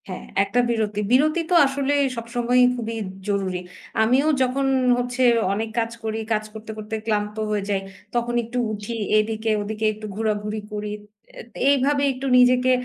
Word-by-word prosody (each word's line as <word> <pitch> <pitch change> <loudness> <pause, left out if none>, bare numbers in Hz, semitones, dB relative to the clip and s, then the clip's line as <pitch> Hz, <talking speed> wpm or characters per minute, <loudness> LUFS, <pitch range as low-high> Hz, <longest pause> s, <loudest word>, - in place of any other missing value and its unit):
হ্যাঁ, 185 - -6 0.2
একটা 200 +5 0
বিরতি। 215 -3 -1
বিরতি 305 +6 +4
তো - - +4
আসলে 275 +1 0 0.2
সবসময়ই 240 +2 +2
খুবই 230 -2 -4 0.3
জরুরি। 195 -3 -1 0.4
আমিও 255 +6 +3
যখন 260 +2 +1 0.3
হচ্ছে 245 +1 -1 0.3
অনেক 220 +2 -2
কাজ 230 0 -1
করি, 220 0 -2
কাজ 215 0 0
করতে, 220 0 -8
করতে 215 +1 -5
ক্লান্ত 210 -1 -1 0.2
হয়ে 205 -1 0
যাই। 195 -1 0 0.3
তখন 240 0 0
একটু 235 +2 -6
উঠি, 210 +2 -5 0.2
এদিকে 220 +1 0
ওদিকে 215 +1 -3
একটু 215 +1 -9
ঘোরাঘুরি 210 0 -2
করি। 210 0 -4 0.4
এ্যা - - -9 0.3
এইভাবে 280 +1 +2
একটু 260 +1 -7
নিজেকে, 250 +1 +5
225 Hz, 155 wpm, -23 LUFS, 210-250 Hz, 0.4 s, নিজেকে